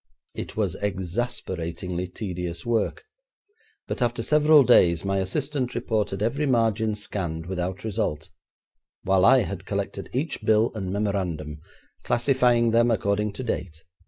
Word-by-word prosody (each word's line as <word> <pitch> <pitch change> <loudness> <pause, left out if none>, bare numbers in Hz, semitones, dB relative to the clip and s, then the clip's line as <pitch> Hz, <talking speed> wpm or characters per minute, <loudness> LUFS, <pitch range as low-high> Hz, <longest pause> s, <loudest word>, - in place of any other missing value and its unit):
It - - -7
was - - 0
exasperatingly 90 -3 -3
tedious 90 -3 -5
work, 115 -3 0 0.8
but - - -4
after 120 -1 0
several 150 +1 +6
days 85 -7 +4
my 100 0 0
assistant 130 +6 -2
reported 105 -4 -1
every 140 +7 0
margin 110 -3 +1
scanned 90 -6 -4
without 90 +1 -4
result, 80 -8 -2 0.7
while 95 -1 +3
I 130 0 +6
had 95 -1 -6
collected 100 -1 -3
each 135 +1 -2
bill 110 +1 +3
and 100 -5 -4
memorandum, 90 -7 -2 0.4
classifying 120 -2 +2
them 115 +1 +4
according 105 -1 0
to 115 - -6
date. 85 -9 -4
105 Hz, 130 wpm, -25 LUFS, 90-120 Hz, 0.8 s, several